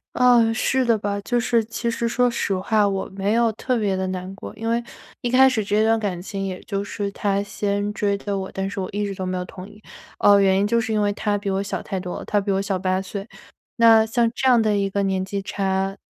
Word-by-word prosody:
呃， 240 Hz, -2 st, +5 dB
是 260 Hz, +1 st, +1 dB
的 230 Hz, -2 st, +3 dB
吧。 200 Hz, 0 st, -3 dB
就 240 Hz, +4 st, 0 dB
是 235 Hz, -1 st, +2 dB
其 235 Hz, +1 st, -3 dB
实 235 Hz, -, -1 dB
说 245 Hz, +1 st, +2 dB
实 200 Hz, -4 st, -1 dB
话， 205 Hz, +2 st, +2 dB
我 195 Hz, -1 st, -2 dB
没 200 Hz, +2 st, 0 dB
有 235 Hz, -1 st, +3 dB
特 250 Hz, +2 st, -1 dB
别 200 Hz, -3 st, 0 dB
地 190 Hz, 0 st, -2 dB
难 185 Hz, 0 st, -5 dB
过。 -, -, -8 dB
因 225 Hz, -, -5 dB
为 235 Hz, +1 st, +1 dB, 0.4 s
一 240 Hz, -, -1 dB
开 260 Hz, +1 st, +6 dB
始 230 Hz, -5 st, +1 dB
这 210 Hz, +2 st, +1 dB
段 225 Hz, 0 st, +3 dB
感 195 Hz, -5 st, -2 dB
情 195 Hz, +1 st, -5 dB
也 185 Hz, -1 st, -4 dB
就 200 Hz, 0 st, -3 dB
是 200 Hz, 0 st, -4 dB
他 200 Hz, 0 st, 0 dB
先 205 Hz, 0 st, -2 dB
追 200 Hz, -1 st, 0 dB
的 200 Hz, 0 st, -4 dB
我， 190 Hz, 0 st, -5 dB
但 195 Hz, 0 st, -3 dB
是 200 Hz, 0 st, -5 dB
我 185 Hz, -, -3 dB
一 205 Hz, +1 st, -2 dB
直 200 Hz, -, -3 dB
都 190 Hz, -1 st, -6 dB
没 185 Hz, 0 st, -2 dB
有 180 Hz, -, -3 dB
同 185 Hz, +2 st, -10 dB
意。 210 Hz, +1 st, -17 dB, 0.4 s
呃， 200 Hz, 0 st, +6 dB
原 190 Hz, -1 st, +4 dB
因 200 Hz, -, +2 dB
就 230 Hz, +2 st, +2 dB
是 220 Hz, -, -3 dB
因 210 Hz, -, +1 dB
为 205 Hz, 0 st, +1 dB
他 205 Hz, 0 st, -1 dB
比 200 Hz, -1 st, -4 dB
我 195 Hz, +1 st, 0 dB
小 200 Hz, -, -3 dB
太 195 Hz, -3 st, -3 dB
多 180 Hz, -1 st, -5 dB
了， -, -, -8 dB
他 205 Hz, -1 st, +1 dB
比 200 Hz, -, -2 dB
我 195 Hz, -, +1 dB
小 195 Hz, -2 st, -2 dB
8 185 Hz, 0 st, 0 dB
岁。 195 Hz, +2 st, -6 dB, 0.5 s
那 225 Hz, -1 st, +6 dB
像 230 Hz, +1 st, +1 dB
这 265 Hz, 0 st, +1 dB
样 240 Hz, -2 st, +6 dB
的 215 Hz, -2 st, +2 dB
一 200 Hz, -1 st, 0 dB
个 200 Hz, +1 st, -1 dB
年 190 Hz, -1 st, 0 dB
纪 200 Hz, +1 st, -4 dB
差， 195 Hz, -1 st, -1 dB
205 Hz, 280 characters per minute, -22 LUFS, 195-225 Hz, 0.5 s, 开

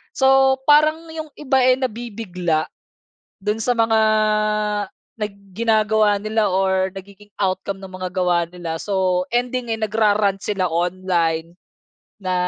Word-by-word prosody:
So 265 Hz, 0 st, +4 dB
parang 310 Hz, +2 st, +4 dB
'yong 315 Hz, -1 st, -7 dB
iba 270 Hz, -3 st, +1 dB
eh, 255 Hz, -, +6 dB
nabibigla, 205 Hz, -10 st, -2 dB, 0.8 s
dun 210 Hz, +2 st, -1 dB
sa 245 Hz, -, +2 dB
mga 225 Hz, -1 st, +3 dB, 1.2 s
nag 210 Hz, -1 st, -2 dB, 0.2 s
ginagawa 215 Hz, -1 st, +2 dB
nila 215 Hz, 0 st, 0 dB
or 190 Hz, 0 st, +1 dB
nagiging 200 Hz, +2 st, -12 dB
outcome 195 Hz, 0 st, -1 dB
ng -, -, -6 dB
mga 185 Hz, 0 st, -5 dB
gawa 175 Hz, -2 st, +1 dB
nila 170 Hz, -2 st, -5 dB
so 185 Hz, -3 st, +1 dB
ending 245 Hz, 0 st, -1 dB
eh, 225 Hz, -, -1 dB
nag 215 Hz, -2 st, -3 dB
ra-rant 205 Hz, -2 st, +2 dB
sila 195 Hz, -3 st, -1 dB
online, 170 Hz, -1 st, -1 dB, 0.7 s
na 185 Hz, -1 st, -2 dB
205 Hz, 130 wpm, -21 LUFS, 185-230 Hz, 1.2 s, eh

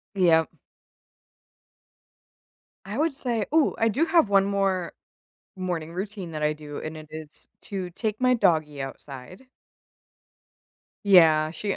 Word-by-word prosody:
Yep. 165 Hz, -4 st, +4 dB, 2.4 s
I 205 Hz, +4 st, -5 dB
would 310 Hz, +1 st, +1 dB
say 240 Hz, -6 st, -2 dB
ooh, 315 Hz, -2 st, +3 dB
I 225 Hz, -, +2 dB
do 275 Hz, +10 st, +1 dB
have 330 Hz, -, +3 dB
one 195 Hz, -1 st, +4 dB
more 195 Hz, -3 st, -1 dB, 0.6 s
morning 175 Hz, -4 st, -4 dB
routine 190 Hz, -1 st, -6 dB
that 155 Hz, -1 st, -4 dB
I 150 Hz, 0 st, +2 dB
do, 150 Hz, -1 st, -9 dB
and 155 Hz, 0 st, -6 dB
it 155 Hz, 0 st, -10 dB
is 155 Hz, -1 st, -10 dB
to 190 Hz, -3 st, -5 dB
take 215 Hz, +4 st, -3 dB
my 255 Hz, 0 st, +4 dB
doggy 155 Hz, -, +1 dB
outside. 135 Hz, -, -9 dB, 1.6 s
Yeah, 160 Hz, -5 st, +6 dB
she 200 Hz, +4 st, -3 dB
185 Hz, 125 wpm, -25 LUFS, 155-210 Hz, 2.4 s, Yeah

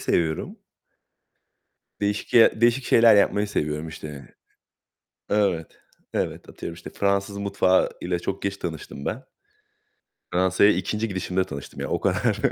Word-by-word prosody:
seviyorum. 80 Hz, -2 st, -1 dB, 1.4 s
Değişik 100 Hz, 0 st, -2 dB
ye 115 Hz, -2 st, +6 dB
değişik 120 Hz, +2 st, +3 dB
şeyler 115 Hz, -1 st, +6 dB
yapmayı 100 Hz, +1 st, +3 dB
seviyorum 75 Hz, -4 st, -2 dB
işte. 75 Hz, -4 st, -9 dB, 1.0 s
Evet. 95 Hz, -6 st, 0 dB, 0.3 s
Evet, -, -, -3 dB
atıyorum 85 Hz, -, -7 dB
işte 85 Hz, -, -10 dB
Fransız 100 Hz, 0 st, 0 dB
mutfağı 100 Hz, -2 st, +2 dB
ile 90 Hz, 0 st, -1 dB
çok 95 Hz, +2 st, -4 dB
geç 100 Hz, 0 st, -2 dB
tanıştım 80 Hz, -5 st, -6 dB
ben. 125 Hz, +5 st, -3 dB, 1.1 s
Fransa'ya 95 Hz, +3 st, +4 dB
2'nci 105 Hz, +4 st, -1 dB
gidişimde 95 Hz, -1 st, -1 dB
tanıştım 70 Hz, -4 st, -8 dB
yani -, -, -4 dB
o -, -, 0 dB
kadar. -, -, +1 dB
95 Hz, 125 wpm, -24 LUFS, 85-105 Hz, 1.4 s, ye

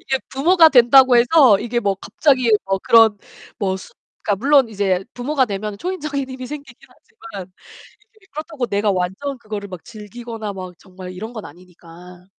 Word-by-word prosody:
이게 265 Hz, -1 st, -2 dB
부모가 325 Hz, +5 st, +4 dB
된다고 255 Hz, -1 st, +6 dB
해서 245 Hz, -3 st, +5 dB
이게 240 Hz, +1 st, -2 dB
뭐 200 Hz, -3 st, 0 dB
갑자기 255 Hz, +4 st, +1 dB
뭐 195 Hz, 0 st, -1 dB
그런 225 Hz, -2 st, +5 dB, 0.4 s
뭐 190 Hz, -2 st, -1 dB
숫 190 Hz, -, -13 dB, 0.3 s
그러니까 205 Hz, +3 st, -2 dB
물론 280 Hz, -3 st, +4 dB
이제 195 Hz, -3 st, -1 dB
부모가 265 Hz, +2 st, 0 dB
되면 205 Hz, -2 st, -5 dB
초인적인 300 Hz, -7 st, -4 dB
힘이 255 Hz, -1 st, -8 dB
생기긴 280 Hz, -4 st, -11 dB
하지만 205 Hz, -, -12 dB, 0.6 s
이게 420 Hz, -3 st, -25 dB
그렇다고 305 Hz, -3 st, -5 dB
내가 205 Hz, -1 st, 0 dB
완전 190 Hz, +9 st, -3 dB
그거를 210 Hz, -2 st, -7 dB
막 185 Hz, -4 st, -10 dB
즐기거나 220 Hz, 0 st, -8 dB
막 185 Hz, -2 st, -9 dB
정말 185 Hz, -1 st, -11 dB
이런 215 Hz, +6 st, -8 dB
건 220 Hz, -3 st, -8 dB
아니니까 180 Hz, +1 st, -15 dB
225 Hz, 360 characters per minute, -19 LUFS, 195-265 Hz, 0.6 s, 된다고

